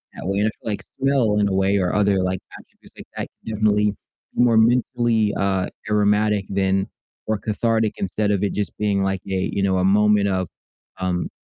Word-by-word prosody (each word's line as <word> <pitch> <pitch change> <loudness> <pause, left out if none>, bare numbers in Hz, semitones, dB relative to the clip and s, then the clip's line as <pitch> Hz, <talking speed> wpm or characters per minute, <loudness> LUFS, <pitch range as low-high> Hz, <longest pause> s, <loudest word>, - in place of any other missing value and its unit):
that 85 - -7
way, 100 +1 0
and 105 - +2
I - - 0
feel - - -9
like 100 - -3
smell 130 -6 0
in 100 - +3
a - - -2
way 95 +1 +2
or 90 -2 0
other, 100 -2 +3
like, 95 0 -1 0.2
attributes - - -19
like - - -10
that - - -3 0.2
can 110 - -4
definitely 105 0 +2 0.4
be - - +2
more 115 -2 +4
mentally, 115 -2 +2
uh, 95 -2 0 0.2
aromatic 105 -1 +2
than 95 0 0 0.4
or 110 0 0
cathartic 110 +1 0
instead 105 +2 -1
of 100 -1 0
it 100 - 0
just 105 -2 -3
being, 100 -2 0
like, 95 -1 -1
a 95 -1 -1
you 100 - -1
know, 95 -1 +2
a 90 - +1
moment 105 +1 +4
of, 95 -2 -1 0.5
um, 90 -1 -1
100 Hz, 205 wpm, -22 LUFS, 95-110 Hz, 0.5 s, more